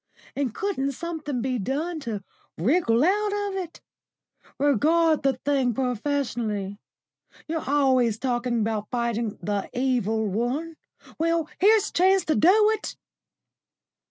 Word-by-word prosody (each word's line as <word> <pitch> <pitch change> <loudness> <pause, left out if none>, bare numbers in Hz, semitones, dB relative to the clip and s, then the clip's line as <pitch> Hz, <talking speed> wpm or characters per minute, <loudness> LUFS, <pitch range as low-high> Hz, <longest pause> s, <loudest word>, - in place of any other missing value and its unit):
And 275 -4 -1
couldn't 280 -9 -1
something 305 -5 -4
be 255 -2 -1
done 305 - -2
to 220 -8 -5 0.3
wriggle 240 - +2
out 410 +4 +2 0.2
of 390 - -5
it? 355 -3 -6 0.8
Regard 310 +4 +3
the 275 -1 +2
thing 260 -2 0
professionally. 235 -6 -2 0.7
You're 320 -4 -3
always 260 -6 +3
talking 240 -1 -1
about 215 -1 -2
fighting 235 -3 -2
the 205 -1 -2
Evil 240 -4 0
One. 245 - -2 0.4
Well, 330 -1 +1
here's 420 +2 +4
a - - -22
chance 375 +1 +3
to 310 - +1
do 420 +6 +5
it." 440 -1 -4
270 Hz, 125 wpm, -25 LUFS, 235-330 Hz, 0.8 s, do